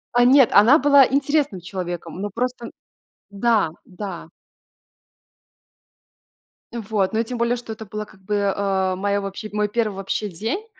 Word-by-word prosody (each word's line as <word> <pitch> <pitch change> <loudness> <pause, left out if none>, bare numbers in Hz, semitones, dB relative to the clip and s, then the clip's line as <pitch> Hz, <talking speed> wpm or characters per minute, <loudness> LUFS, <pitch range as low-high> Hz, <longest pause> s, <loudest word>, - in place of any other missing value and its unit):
А, 245 0 +5
нет, 265 -1 +6
она 230 +8 +7
была 280 -1 +6
интересным 280 -6 0
человеком, 175 -1 -6
ну 205 - -3
просто 245 +2 -4 0.6
да, 210 -3 +1
да. 185 -3 -7 2.5
Вот, 215 -4 -2
но 220 - +1
и 230 - +2
тем 245 +1 -6
более, 235 +1 +1
что 235 -2 -7
это 220 0 -10
было 210 +2 -5
как 190 - -20
бы, 200 0 0
а, 190 -2 0
моя 200 +2 -1
вообще 195 +2 -6
мой 210 0 +1
1 215 -1 -1
вообще 195 +2 -3
день. 225 - -4
210 Hz, 150 wpm, -22 LUFS, 195-240 Hz, 2.5 s, она